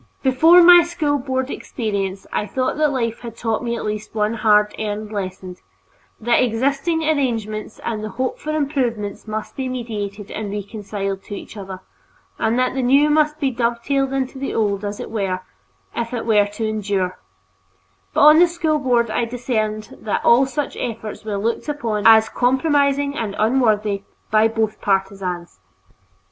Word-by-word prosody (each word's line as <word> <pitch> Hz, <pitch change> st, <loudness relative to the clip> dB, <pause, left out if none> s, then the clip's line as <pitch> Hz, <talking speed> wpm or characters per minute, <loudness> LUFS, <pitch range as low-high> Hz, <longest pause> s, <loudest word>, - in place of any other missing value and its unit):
Before 320 Hz, +7 st, +6 dB
my 350 Hz, 0 st, +9 dB
School 315 Hz, -4 st, -1 dB
Board 260 Hz, 0 st, -2 dB
experience, 200 Hz, -5 st, -3 dB
I 210 Hz, -, -1 dB
thought 255 Hz, +5 st, -1 dB
that 305 Hz, -1 st, +3 dB
life 230 Hz, -4 st, -2 dB
had 230 Hz, -1 st, -9 dB
taught 225 Hz, 0 st, -1 dB
me 235 Hz, -1 st, -1 dB
at -, -, -5 dB
least 210 Hz, +1 st, -5 dB
one 210 Hz, +1 st, +1 dB
hard 210 Hz, -2 st, +3 dB
earned 210 Hz, 0 st, -4 dB
lesson, 185 Hz, -3 st, -5 dB, 0.6 s
that 235 Hz, +2 st, +2 dB
existing 275 Hz, +8 st, 0 dB
arrangements 230 Hz, -9 st, -1 dB
and 215 Hz, -2 st, -3 dB
the 215 Hz, -, -4 dB
hoped 255 Hz, +6 st, -3 dB
for 305 Hz, -, -6 dB
improvements 255 Hz, -10 st, -2 dB
must 215 Hz, 0 st, -5 dB
be 260 Hz, -1 st, -3 dB
mediated 210 Hz, -5 st, -5 dB
and 210 Hz, -2 st, -4 dB
reconciled 200 Hz, -1 st, -4 dB
to 205 Hz, -, -6 dB
each -, -, -10 dB
other, 190 Hz, -2 st, -8 dB, 0.6 s
that 250 Hz, +3 st, +1 dB
the 265 Hz, -, -1 dB
new 280 Hz, +4 st, +4 dB
must 305 Hz, 0 st, +2 dB
be 275 Hz, -3 st, +1 dB
dovetailed 245 Hz, +3 st, 0 dB
into 265 Hz, 0 st, -2 dB
the 275 Hz, -, -3 dB
old 205 Hz, -2 st, 0 dB
as 205 Hz, 0 st, -4 dB
it -, -, -7 dB
were, 195 Hz, -4 st, -2 dB, 0.5 s
if 235 Hz, +1 st, -3 dB
it 235 Hz, -, -4 dB
were 210 Hz, -3 st, +4 dB
to 210 Hz, +2 st, -4 dB
endure; 200 Hz, -4 st, -2 dB, 0.9 s
but -, -, +1 dB
on 305 Hz, +2 st, +8 dB
the 350 Hz, -, +7 dB
School 325 Hz, -3 st, 0 dB
Board 240 Hz, -4 st, +1 dB
I 235 Hz, +2 st, 0 dB
discerned 220 Hz, -3 st, -3 dB
that 215 Hz, -, -2 dB
all 255 Hz, +3 st, +5 dB
such 290 Hz, +2 st, -3 dB
efforts 220 Hz, -2 st, -5 dB
were 210 Hz, -2 st, -3 dB
looked 230 Hz, +8 st, -2 dB
upon 230 Hz, -8 st, 0 dB
as 220 Hz, 0 st, +7 dB
compromising 280 Hz, +2 st, +1 dB
and 215 Hz, -6 st, -3 dB
unworthy, 215 Hz, -4 st, +2 dB, 0.3 s
by 215 Hz, +1 st, +5 dB
both 220 Hz, -1 st, -2 dB
partisans. 190 Hz, -, -2 dB
225 Hz, 165 wpm, -20 LUFS, 210-265 Hz, 0.9 s, my